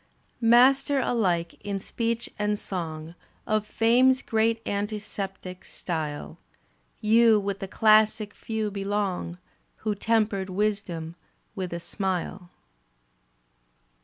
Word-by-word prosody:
Master 265 +4 +5
alike 180 -9 0
in 200 -1 -2
speech 230 +3 -2
and 210 0 +1
song 165 -5 -5 0.3
Of 215 -1 0
Fame's 250 +4 +4
great 225 +1 +1
antiseptic. 200 -3 -4
Style, 155 -4 -5 0.6
You 225 0 +5
with 200 -1 -3
the 195 - -4
classic 215 0 +4
few 220 -2 -3
belong. 195 -3 -2 0.5
Who 215 - +2
tempered 210 -2 0
wisdom 185 -5 -2 0.4
with 190 -4 -4
a 170 - -3
smile. 185 0 -3
205 Hz, 100 wpm, -26 LUFS, 185-225 Hz, 0.6 s, Master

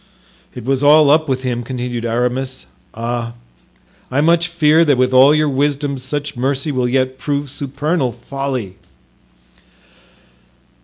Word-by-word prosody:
"It 125 -3 -8
was 135 0 0
all 145 0 +6
up 155 0 +3
with 130 0 -1
him," 125 -2 -2
continued 120 -1 -4
Aramis; 125 - -2 0.3
"ah 115 0 -4 0.7
I 130 - 0
much 170 +3 +3
fear 165 -1 +3
that 145 -5 +2
with 130 0 +1
all 135 +4 +6
your 155 0 +2
wisdom 140 0 -1
such 145 +2 -4
mercy 135 +4 -1
yet - - -6 0.3
will 130 - -18
prove 145 -1 -3
supernal 140 0 -2
folly." 125 -5 -5
135 Hz, 135 wpm, -17 LUFS, 125-145 Hz, 0.7 s, all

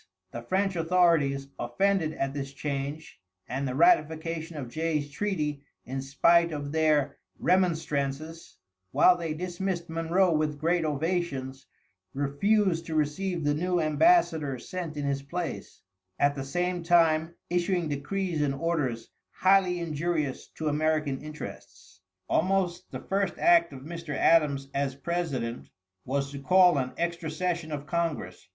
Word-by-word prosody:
The 120 - -6
French 190 +10 0
authorities, 165 -5 +2
offended 160 +6 +1
at 135 -2 -2
this 140 -1 -5
change, 140 -1 -5 0.3
and 135 +3 -2
the 130 - -3
ratification 160 - +2
of 135 -4 -5
Jay's 150 +1 -2
treaty 150 -5 -2 0.2
in 135 +2 -4
spite 170 +5 +3
of 145 -2 -4
their 150 -3 +2 0.2
remonstrances, 160 -3 -1 0.3
while 180 - +5
they 165 -3 -4
dismissed 175 0 -3
Monroe 170 +3 +2
with 155 -1 0
great 165 +1 +1
ovations, 145 -4 -2 0.5
refused 165 +5 +1
to 160 - -3
receive 165 +3 -1
the 145 0 +2
new 180 +3 0
embassador 155 - +3
sent 165 +3 -6
in 145 - -2
his 140 -1 -1
place, 170 +4 -6 0.3
at 145 0 +3
the 135 -1 -5
same 175 +5 -1
time 165 -1 +3 0.2
issuing 175 -1 +1
decrees 160 +3 -2
and 140 -2 +1
orders 135 -7 -2 0.2
highly 185 -2 +3
injurious 155 -3 -2
to 160 - -4
American 150 -2 0
interests. 150 -10 -10 0.3
Almost 180 0 0
the - - -6
first 195 -2 -1
act 170 -1 +4
of 135 -2 -9
Mr. 165 0 -6
Adams, 145 -4 +3
as 140 -1 -1
President, 140 -6 -3 0.4
was 140 +1 -1
to 140 - -6
call 180 +1 +5
an 130 -1 -3
extra 170 -1 -2
session 170 0 -2
of 145 -1 -4
Congress. 155 - -3
160 Hz, 135 wpm, -28 LUFS, 140-175 Hz, 0.5 s, while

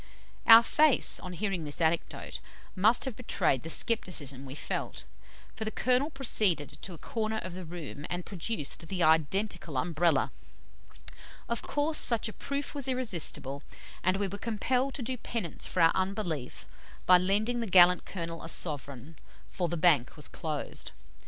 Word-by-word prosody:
Our 230 0 +10
face, 300 +3 +3
on 180 - -8
hearing 190 -2 -2
this 145 -1 0
anecdote, 165 0 -1 0.4
must 215 +8 +3
have 260 -4 -4
betrayed 180 - 0
the 165 - -8
scepticism 150 - +1
we 135 - -8
felt, - - -4 0.5
for 220 - -4
the 215 - -2
Colonel 255 +5 +1
proceeded 195 - 0
to 185 - -5
a - - -12
corner 220 +4 -3
of 185 -4 -5
the 185 0 -7
room, 160 -3 -8
and 175 0 -4
produced 170 -4 -3
the 180 -1 -1
identical 160 0 +1
Umbrella. 165 +4 +1 1.2
Of 235 - -2
course, 300 +2 0
such 235 -2 +2
a 215 - -7
proof 280 0 -4
was 280 -3 -1
irresistible, 170 - -1 0.4
and 185 +1 +2
we 200 0 0
were 200 +2 -6
compelled 250 +5 -1
to 260 - -5
do 255 +2 -3
penance 220 -7 -4
for 180 - -1
our 165 - +6
unbelief 185 - -3 0.4
by 180 -1 +7
lending 210 +6 +1
the 230 - -3
gallant 180 -1 +6
Colonel 165 -3 -6
a 165 - -6
sovereign, 145 -2 0 0.3
for 180 -2 -2
"the 170 - -3
Bank 155 -7 +3
was 150 - -3
closed." 155 -3 -3
185 Hz, 160 wpm, -29 LUFS, 160-225 Hz, 1.2 s, Our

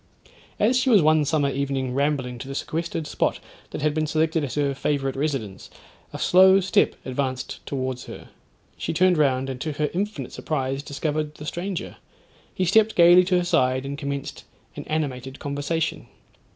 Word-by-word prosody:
As 245 +5 +3
she 260 - +1
was 210 -8 +6
one 155 -1 +4
summer 145 -2 +1
evening 135 -2 -2
rambling 135 -3 -1
to 135 - -7
the 135 - -6
sequestered 165 +1 -3
spot - - -1 0.3
that - - -6
had 155 -1 +2
been 155 0 0
selected 160 +1 +1
as 130 -4 -4
her 145 -2 +1
favourite 135 -1 -1
residence, 135 -9 -3 0.4
a - - -6
slow 190 +1 +6
step 190 - +2
advanced 130 0 -3
towards 130 -2 -3
her. - - -10 0.5
She - - -2
turned 185 +2 +4
round, 135 -2 +2
and 130 -1 -6
to 155 - -2
her 150 +1 -1
infinite 205 +4 -3
surprise 135 -3 -2
discovered 150 +1 -3
the 150 - -9
stranger. 180 +3 -4 0.5
He 185 - -1
stepped 220 +5 +3
gaily 175 +1 +7
to 180 0 +2
her 180 - 0
side, 130 -5 +1
and 140 +1 -4
commenced 140 -1 -5 0.3
an - - -7
animated 135 -4 -3
conversation. 145 +3 -3
145 Hz, 170 wpm, -24 LUFS, 135-165 Hz, 0.5 s, gaily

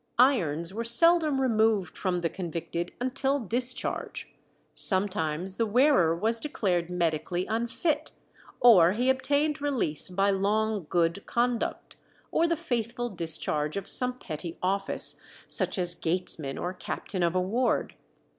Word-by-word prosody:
Irons 180 - +2
were 230 +3 -4
seldom 305 +4 +5
removed 220 -6 +1
from 180 -2 -2
the 165 - -1
convicted 170 -1 -5
until 265 +3 -1
discharge; 245 +2 -2 0.4
sometimes 185 -2 0
the 230 - 0
wearer 230 - +3
was 225 +6 0
declared 185 - -2
medically 175 0 -2
unfit, 285 +8 -2 0.5
or 190 -8 +6
he 250 +4 +2
obtained 285 +3 0
release 260 - -1
by 195 +2 +1
long 205 -1 -1
good 170 +2 0
conduct, 240 0 -2 0.3
or 335 - +2
the 335 - 0
faithful 240 -6 -3
discharge 160 -3 -1
of 200 - -5
some 250 0 +4
petty 165 -4 -7
office, 195 +2 +3 0.3
such - - -1
as 175 -1 +4
gatesman 160 -5 -1
or 180 +1 -4
captain 185 +1 -5
of 170 0 0
a - - +2
ward. 225 +8 -1
200 Hz, 130 wpm, -27 LUFS, 175-250 Hz, 0.5 s, or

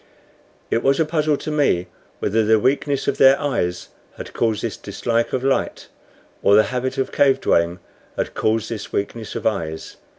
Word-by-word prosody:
It 115 - +2
was 135 +2 +2
a 160 - +3
puzzle 155 -1 +1
to 155 - -5
me 140 - +1 0.3
whether 110 +2 +1
the 110 +1 +4
weakness 135 +4 0
of - - -1
their 135 0 +6
eyes 90 -12 -2 0.3
had - - -8
caused 110 -3 0
this - - -2
dislike 115 0 -2
of 130 - -2
light, 135 0 -1 0.5
or 100 - +5
the 110 - +6
habit 125 +1 -2
of 135 - -1
cave 135 -2 +3
dwelling 85 -5 +1 0.4
had - - -2
caused 110 0 0
this 110 -3 -6
weakness 110 +2 -4
of - - -5
eyes. 80 -7 -3
115 Hz, 175 wpm, -21 LUFS, 105-135 Hz, 0.5 s, their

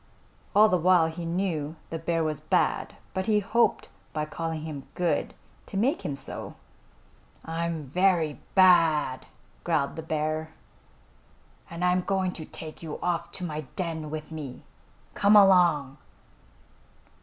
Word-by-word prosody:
All 210 +1 +8
the 180 -4 +2
while 170 -1 +4
he 170 +1 -6
knew 165 -3 -2 0.2
the 165 - -3
bear 165 0 0
was 155 -2 -2
bad, - - 0 0.2
but 190 0 -2
he 215 -1 +4
hoped 235 +4 +1 0.3
by 150 -1 -1
calling 160 +1 -4
him 150 -4 -7
good, 175 -1 0 0.3
to 195 - -5
make 265 - +1
him 145 - -3
so. 135 0 -7 0.9
"I'm 165 -1 -3
very 165 0 +1
bad!" 165 -8 +4 0.4
growled 155 -5 0
the 160 - -5
bear, 155 0 -2 1.2
"and 170 +1 -3
I'm 180 0 +3
going 190 -1 0
to 160 -3 -8
take 155 0 -9
you 160 -3 -6
off 170 -1 -1
to 185 - -6
my 155 -3 -3
den 165 -4 -3
with 155 +1 -6
me. 145 -5 -7 0.5
Come 205 +1 +4
along!" 175 -9 +5
165 Hz, 140 wpm, -27 LUFS, 155-180 Hz, 1.2 s, All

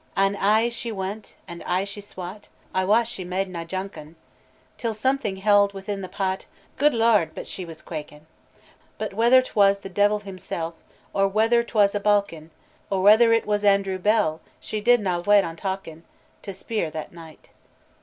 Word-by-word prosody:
"An' 195 +1 +2
ay 215 +4 +3
she 235 0 -5
win't, 200 +1 -6
an' 170 -1 -9
ay 180 +2 +1
she 200 +1 -7
swat 195 0 -9 0.2
I 185 - +1
wat 220 +4 +3
she 195 -5 -5
made 185 +2 -2
nae 170 -2 -5
jaukin; 170 -3 -7 0.6
Till 230 -2 -2
something 260 -3 0
held 200 0 +3
within 195 +1 -5
the 185 - -7
pat, 190 0 -3 0.3
Guid 295 -2 +4
Lord! 220 -8 +3
but - - -6
she 185 - -6
was 165 -2 -11
quakin! 150 -1 -8 0.7
But 215 -2 -4
whether 240 +5 +5
't - - -12
was 200 -1 +4
the 195 - -8
Deil 205 +2 +2
himsel, 185 -4 -6 0.4
Or 195 0 +3
whether 225 +4 +3
't 235 - -12
was 200 -1 +5
a 205 - 0
bauk 205 -2 +2
en' 155 0 -12 0.4
Or 190 -1 0
whether 220 +3 +7
it 230 0 +3
was 210 0 0
Andrew 195 -2 +2
Bell, 180 -6 +1 0.2
She 215 - -5
did 240 +1 +4
na 180 -3 -1
wait 205 +2 +4
on 165 -1 -5
talkin 170 -3 -5 0.4
To 200 - -7
speir 195 -2 -3
that 155 +1 -7
night." 165 -2 -14
195 Hz, 185 wpm, -24 LUFS, 185-215 Hz, 0.7 s, whether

